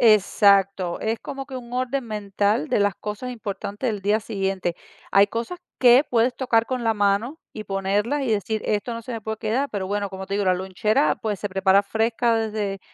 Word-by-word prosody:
Exacto, 200 Hz, -4 st, +4 dB
es 220 Hz, +1 st, -1 dB
como 275 Hz, -1 st, -6 dB
que 265 Hz, -2 st, -7 dB
un 240 Hz, -1 st, -9 dB
orden 255 Hz, +1 st, -1 dB
mental 205 Hz, -5 st, -1 dB
de -, -, +1 dB
las 205 Hz, -2 st, +2 dB
cosas 210 Hz, +5 st, -5 dB
importantes 215 Hz, 0 st, -4 dB
del 205 Hz, -3 st, -3 dB
día 205 Hz, +2 st, +2 dB
siguiente. 195 Hz, -5 st, -2 dB, 0.4 s
Hay 200 Hz, +1 st, +6 dB
cosas 235 Hz, -, -4 dB, 0.2 s
que 250 Hz, +2 st, +7 dB
puedes 245 Hz, -1 st, +1 dB
tocar 230 Hz, -3 st, +1 dB
con 255 Hz, -1 st, -2 dB
la 225 Hz, -1 st, +2 dB
mano 205 Hz, +8 st, +1 dB, 0.2 s
y 215 Hz, -, -5 dB
ponerlas 200 Hz, +8 st, 0 dB
y 260 Hz, -, -1 dB
decir, 215 Hz, +1 st, -1 dB
esto 215 Hz, +3 st, -1 dB
no 230 Hz, -, -6 dB
se 245 Hz, -, -7 dB
me 225 Hz, -, -4 dB
puede 220 Hz, +1 st, -4 dB
quedar, 235 Hz, +7 st, -1 dB
pero 195 Hz, -3 st, -3 dB
bueno, 200 Hz, 0 st, -2 dB
como 190 Hz, 0 st, -7 dB
te 200 Hz, -, -3 dB
digo, 205 Hz, -, 0 dB
la 185 Hz, -1 st, +3 dB
lonchera, 185 Hz, -3 st, +1 dB
pues, 210 Hz, -3 st, -2 dB
se 205 Hz, -, -3 dB
prepara 190 Hz, +1 st, +3 dB
fresca 225 Hz, +2 st, +1 dB
desde 210 Hz, -3 st, -2 dB
215 Hz, 205 wpm, -23 LUFS, 200-235 Hz, 0.4 s, que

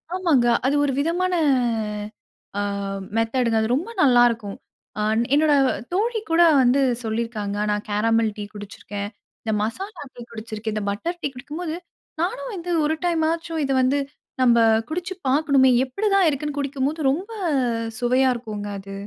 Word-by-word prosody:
ஆமாங்க. 320 Hz, -10 st, +3 dB, 0.2 s
அது 275 Hz, +2 st, +2 dB
ஒரு 280 Hz, -, 0 dB
விதமான 355 Hz, +4 st, 0 dB, 1.3 s
அ -, -, +1 dB, 0.6 s
மெத்தடுங்க 225 Hz, 0 st, +1 dB
அது 220 Hz, -, 0 dB
ரொம்ப 335 Hz, -, -3 dB
நல்லாருக்கும். 240 Hz, -6 st, +3 dB, 0.5 s
ஆன் 220 Hz, +2 st, +2 dB
என்னோட 300 Hz, +1 st, +4 dB, 0.4 s
தோழி 445 Hz, +4 st, +1 dB
கூட 330 Hz, -, +4 dB, 0.2 s
வந்து 255 Hz, +3 st, +3 dB, 0.2 s
சொல்லிருக்காங்க. 220 Hz, -2 st, -3 dB, 0.2 s
நான் 210 Hz, 0 st, -2 dB
கேரமல் 225 Hz, +2 st, +2 dB
டீ 205 Hz, -, -4 dB
குடிச்சிருக்கேன். 205 Hz, 0 st, -7 dB, 0.3 s
இந்த 220 Hz, -, -1 dB
மசாலா 375 Hz, -, -4 dB
டீ 245 Hz, -, -10 dB
குடிச்சிருக்கேன். 220 Hz, -1 st, -5 dB
இந்த 215 Hz, -, -2 dB
பட்டர் 335 Hz, -, -3 dB
டீ -, -, 0 dB
குடிக்கும்போது 310 Hz, +6 st, -5 dB, 0.5 s
நானும் 475 Hz, +8 st, -2 dB
வந்து 355 Hz, -2 st, -5 dB
ஒரு 315 Hz, +1 st, +1 dB
டைமாச்சும் 330 Hz, -1 st, 0 dB
இத 270 Hz, -, -2 dB
வந்து 260 Hz, +3 st, +2 dB, 0.4 s
நம்ப 240 Hz, -2 st, +5 dB, 0.3 s
குடிச்சு 360 Hz, +4 st, -3 dB
பாக்கணுமே! 275 Hz, -1 st, +4 dB
எப்டிதான் 395 Hz, +7 st, +2 dB
இருக்குன்னு 295 Hz, 0 st, -2 dB
குடிக்கும்போது 280 Hz, +2 st, -2 dB
ரொம்ப 365 Hz, +11 st, -2 dB, 0.7 s
சுவையா 255 Hz, +2 st, +3 dB
இருக்குங்க, 215 Hz, -4 st, -6 dB
அது. 195 Hz, 0 st, -9 dB
265 Hz, 135 wpm, -23 LUFS, 225-330 Hz, 1.3 s, நம்ப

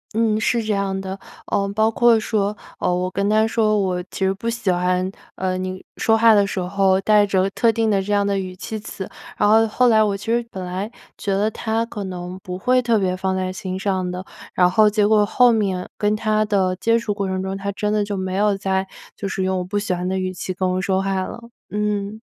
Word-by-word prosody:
嗯， 220 Hz, -1 st, +2 dB
是 230 Hz, +1 st, +1 dB
这 215 Hz, -1 st, 0 dB
样 195 Hz, -1 st, -1 dB
的。 190 Hz, 0 st, -6 dB, 0.3 s
呃， 200 Hz, -1 st, 0 dB
包 220 Hz, +1 st, +3 dB
括 235 Hz, -1 st, +4 dB
说， 210 Hz, -1 st, -1 dB, 0.2 s
呃， 180 Hz, -, +1 dB
我 180 Hz, +1 st, -1 dB
跟 200 Hz, +1 st, 0 dB
他 215 Hz, +1 st, +4 dB
说 215 Hz, -2 st, +2 dB
我 185 Hz, -2 st, 0 dB
其 190 Hz, -, -2 dB
实 190 Hz, -, +2 dB
不 230 Hz, +4 st, -4 dB
喜 230 Hz, -5 st, 0 dB
欢， 180 Hz, +1 st, 0 dB, 0.3 s
呃， 185 Hz, 0 st, -1 dB
你 185 Hz, 0 st, -5 dB
说 225 Hz, 0 st, +3 dB
话 225 Hz, 0 st, +6 dB
的 200 Hz, -1 st, +4 dB
时 195 Hz, -, -3 dB
候 190 Hz, +1 st, +2 dB
带 210 Hz, -1 st, +4 dB
着 190 Hz, -1 st, +2 dB
特 230 Hz, +2 st, +3 dB
定 225 Hz, -1 st, +1 dB
的 195 Hz, -1 st, +2 dB
这 205 Hz, -, -4 dB
样 205 Hz, 0 st, +2 dB
的 200 Hz, -1 st, 0 dB
语 185 Hz, -1 st, -5 dB
气 215 Hz, +4 st, -6 dB
词， 200 Hz, -2 st, -7 dB, 0.3 s
然 -, -, +3 dB
后 220 Hz, +1 st, +5 dB
后 250 Hz, +3 st, +2 dB
来 220 Hz, -2 st, +5 dB
我 200 Hz, -2 st, 0 dB
其 -, -, -11 dB
实 235 Hz, +1 st, +1 dB
本 185 Hz, -1 st, -6 dB
来 190 Hz, +5 st, -4 dB, 0.2 s
觉 200 Hz, -, -3 dB
得 210 Hz, +2 st, +1 dB
他 225 Hz, +1 st, -1 dB
可 210 Hz, -3 st, -6 dB
能 180 Hz, 0 st, -6 dB
不 180 Hz, -2 st, -6 dB
会 250 Hz, +5 st, +2 dB
特 235 Hz, -2 st, +2 dB
别 185 Hz, -2 st, 0 dB
放 190 Hz, 0 st, -1 dB
在 185 Hz, 0 st, -2 dB
心 185 Hz, 0 st, -5 dB
上 190 Hz, -2 st, -1 dB
的， 180 Hz, +1 st, -5 dB, 0.3 s
然 180 Hz, 0 st, +5 dB
后 215 Hz, +2 st, +5 dB
结 210 Hz, -1 st, +2 dB
果 210 Hz, -1 st, +4 dB
后 245 Hz, +3 st, +4 dB
面 195 Hz, -5 st, 0 dB
跟 210 Hz, 0 st, +1 dB
他 215 Hz, 0 st, +1 dB
的 190 Hz, -3 st, +1 dB
接 230 Hz, +4 st, +2 dB
触 230 Hz, -3 st, -2 dB
过 200 Hz, -1 st, -2 dB
程 190 Hz, 0 st, -2 dB
中， 190 Hz, 0 st, -3 dB
他 200 Hz, +1 st, -3 dB
真 210 Hz, +1 st, -1 dB
的 210 Hz, -, +2 dB
就 205 Hz, -1 st, -3 dB
没 185 Hz, 0 st, -3 dB
有 205 Hz, 0 st, +2 dB
再 190 Hz, 0 st, -1 dB, 0.3 s
就 200 Hz, -, -4 dB
是 190 Hz, 0 st, -2 dB
用 190 Hz, 0 st, 0 dB
我 -, -, -2 dB
不 190 Hz, +3 st, -3 dB
喜 205 Hz, -2 st, -1 dB
欢 180 Hz, +1 st, -2 dB
的 190 Hz, -, -1 dB
语 185 Hz, 0 st, -2 dB
气 185 Hz, +1 st, -4 dB
跟 185 Hz, +1 st, 0 dB
我 185 Hz, 0 st, -1 dB
说 190 Hz, 0 st, 0 dB
话 195 Hz, -1 st, 0 dB
了， -, -, -7 dB, 0.3 s
嗯。 210 Hz, 0 st, -2 dB
200 Hz, 265 characters per minute, -21 LUFS, 185-215 Hz, 0.3 s, 话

